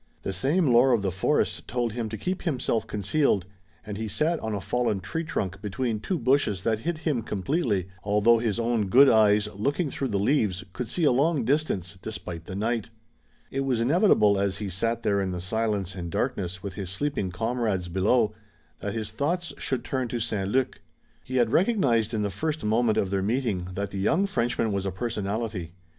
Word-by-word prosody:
The 95 - -2
same 145 - +2
lore 125 0 +5
of 110 -4 +1
the 95 - 0
forest 95 - 0
told 120 -3 -1
him 115 -2 -3
to 110 - -5
keep 185 - -3
himself 125 - -1
concealed, 105 0 +1 0.4
and 105 -1 -5
he 110 - -2
sat 155 +10 0
on 110 -1 -3
a - - -2
fallen 115 0 0
tree 165 - -3
trunk 95 - -3
between 110 +2 -2
two 180 - -2
bushes 125 - +1
that 110 -2 +1
hid 165 +7 -2
him 155 -7 -1
completely, 105 - -1 0.2
although 105 +3 +4
his 115 -1 -1
own 115 -3 +1
good 135 +8 +7
eyes, 105 -2 +5
looking 140 - -1
through 135 - -2
the 105 -5 -1
leaves, 100 -4 +1
could 125 - -4
see 175 - -2
a 145 - +5
long 140 0 +2
distance, 100 - -1
despite 90 -7 -6
the 95 - -6
night. 115 +2 -1 0.6
It 135 - -2
was 135 -4 0
inevitable 115 - +4
as 100 -1 0
he 105 -2 -4
sat 115 +5 -1
there 100 -2 +2
in 95 - -1
the 90 -1 -3
silence 100 -1 -1
and 85 -2 -5
darkness 90 +1 -2
with 100 -2 -5
his 95 -1 -5
sleeping 120 -1 -1
comrades 110 -2 -1
below 105 +5 +2 0.5
that 100 +2 -4
his 110 -1 -3
thoughts 170 +9 -1
should 130 -3 -1
turn 130 -2 -1
to 120 +1 -3
St. 105 -4 -1
Luc. 130 +3 0 0.4
He 130 - -6
had 120 -3 +3
recognized 135 - +2
in 105 - 0
the 100 - -1
first 155 +2 -3
moment 110 +1 +2
of 95 - 0
their 100 -1 +1
meeting 105 -4 -1
that 100 +1 -3
the 100 - -4
young 160 - +2
Frenchman 120 - 0
was 100 -1 -1
a - - -1
personality. 105 -3 -3
110 Hz, 200 wpm, -26 LUFS, 100-130 Hz, 0.6 s, good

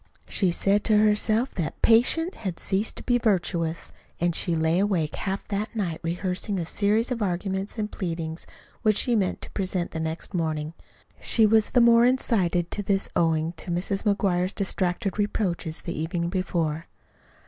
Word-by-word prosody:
She 190 - +1
said 200 +4 +1
to 215 -2 +5
herself 215 +3 +2
that 160 -6 -4
"patience 260 +10 +4
had 185 -6 -5
ceased 200 +3 -1
to - - -7
be 245 -1 +2
virtuous," 170 -6 -1 0.3
and 175 0 +1
she 170 +1 +1
lay 160 +2 +2
awake 185 -6 0
half 195 -1 -4
that 210 +3 -3
night 175 -7 -2
rehearsing 180 +4 -2
a 170 - -2
series 215 +7 +1
of 235 -2 -2
arguments 190 +2 -2
and 215 -1 -3
pleadings 165 -3 -4 0.3
which 215 -3 +3
she 245 - +1
meant 195 -4 0
to - - -7
present 185 -3 -2
the 160 - -4
next 160 +4 -4
morning. 155 -2 -2 0.5
She 225 - +3
was 215 0 +4
the 245 - +3
more 235 0 +6
incited 190 -9 +1
to 205 - -2
this 195 -1 0
owing 160 -1 +1
to 175 - -6
Mrs. 185 +3 -1
McGuire's 195 -3 +1
distracted 190 0 -2
reproaches 180 -6 -1
the 170 - -4
evening 170 +2 -2
before. 165 -4 -2
190 Hz, 170 wpm, -25 LUFS, 170-210 Hz, 0.5 s, more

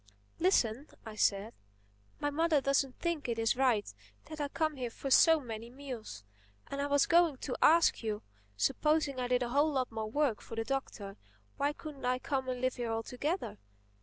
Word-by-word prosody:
"Listen," 280 - +2 0.2
I 220 - -7
said, 210 +1 +1 0.7
"my 290 - -1
mother 320 0 +2
doesn't 275 -1 0
think 335 -6 -2
it 230 - -1
is 225 -1 +2
right 245 - +1 0.3
that 310 -1 -7
I 290 - 0
come 310 +1 -1
here 250 -2 -3
for 270 +3 -6
so 325 +4 +7
many 230 -3 -7
meals. 245 - -8 0.5
And 280 0 -2
I 285 - 0
was 285 -1 +3
going 335 -4 +4
to 255 0 -4
ask 335 +1 +5
you: 215 -2 -3 0.3
supposing 290 - +1
I 250 - -1
did 250 0 +2
a 240 - -3
whole 290 +5 +3
lot 255 -3 -1
more 220 -1 -4
work 280 -3 0
for 225 - -9
the 225 0 -2
Doctor—why 200 - -4
couldn't 295 -3 -8
I 250 0 +2
come 265 0 -2
and 250 -1 -3
live 255 0 0
here 240 -2 -2
altogether? 250 - -3
260 Hz, 185 wpm, -32 LUFS, 225-290 Hz, 0.7 s, so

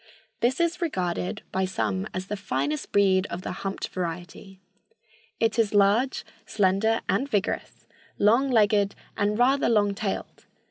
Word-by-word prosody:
This 245 +5 +1
is 340 +1 0
regarded 185 - -2
by 190 0 0
some 190 +1 -2
as 185 0 -4
the 210 - -4
finest 145 -6 -2
breed 195 -1 +3
of 175 +2 -5
the - - -4
humped 195 0 -4
variety. 180 +2 -6 0.8
It 225 0 +1
is 215 -2 +2
large, 205 +6 +3 0.2
slender 205 +3 +1
and 230 +9 0
vigorous, 205 -4 -2 0.3
long 235 +7 +4
legged 210 -4 +3 0.2
and 205 +1 0
rather 260 +2 +3
long 205 -3 +3
tailed. 200 -1 -5
200 Hz, 140 wpm, -26 LUFS, 190-225 Hz, 0.8 s, long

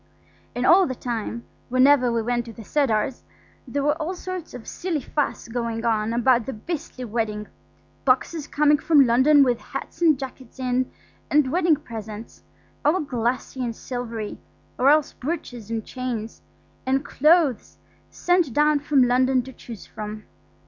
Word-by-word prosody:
And 245 +1 -1
all 365 +4 +6
the 260 - -3
time, 235 -1 -4 0.3
whenever 255 0 +5
we 230 -1 0
went 240 +1 -1
to 230 - -9
the 225 - -10
Cedars, 260 -1 0 0.4
there 280 +3 -2
was 295 +1 +2
all 335 +4 -3
sorts 365 -4 -6
of 245 - -10
silly 345 -4 -2
fuss 285 0 -2
going 230 -1 -3
on 220 -1 +1
about 240 0 +2
the 265 - -3
beastly 275 +1 -6
wedding; 215 -2 -2 0.6
boxes 280 +4 +1
coming 295 0 +3
from 300 -4 +5
London 265 +5 +5
with 245 -3 +1
hats - - -7
and 315 -4 +5
jackets 260 -2 -9
in, 255 0 0 0.4
and 290 -3 +3
wedding 345 -1 +3
presents–all 230 - -5
glassy 255 -1 -2
and 235 -2 -3
silvery, 230 -4 -5 0.4
or 260 +2 +5
else 300 0 +3
brooches 250 -7 -5
and 225 -2 -3
chains–and 255 +2 -5
clothes 305 - +2 0.3
sent 355 -7 +1
down 300 +1 +3
from 285 -2 +3
London 255 +1 +3
to 265 +1 -10
choose 230 -4 -10
from. 215 0 -7
255 Hz, 150 wpm, -24 LUFS, 230-295 Hz, 0.6 s, all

